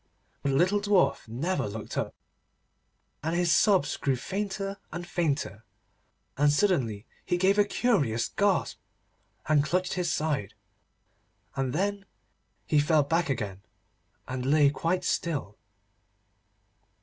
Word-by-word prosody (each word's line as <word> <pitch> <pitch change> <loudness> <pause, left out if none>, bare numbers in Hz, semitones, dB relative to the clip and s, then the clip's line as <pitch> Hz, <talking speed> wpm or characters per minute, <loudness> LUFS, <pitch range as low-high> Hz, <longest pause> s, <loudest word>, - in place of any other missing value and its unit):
But 140 - -1
the 135 - +1
little 185 +7 +3
Dwarf 205 - +2
never 150 - -1
looked 110 +1 -7
up, - - -2 1.1
and 160 +3 -1
his 175 -1 +3
sobs 190 -6 +3
grew 135 -2 0
fainter 195 - -4
and 175 0 -5
fainter, 140 - -2 0.7
and 145 +1 +4
suddenly 135 - +1 0.2
he 175 - 0
gave 195 +3 +3
a - - +7
curious 145 - +1
gasp, 200 -3 0 0.7
and 150 -2 +4
clutched 180 +4 0
his 180 -2 -1
side. 150 -10 -1 1.0
And 135 -2 -1
then 200 +5 -1 0.6
he 150 - +3
fell 150 0 +3
back 160 +3 0
again, 105 -7 -3 0.7
and 130 0 -4
lay 140 +1 +4
quite 170 +5 -1
still. 140 -11 -2
160 Hz, 125 wpm, -28 LUFS, 135-185 Hz, 1.1 s, a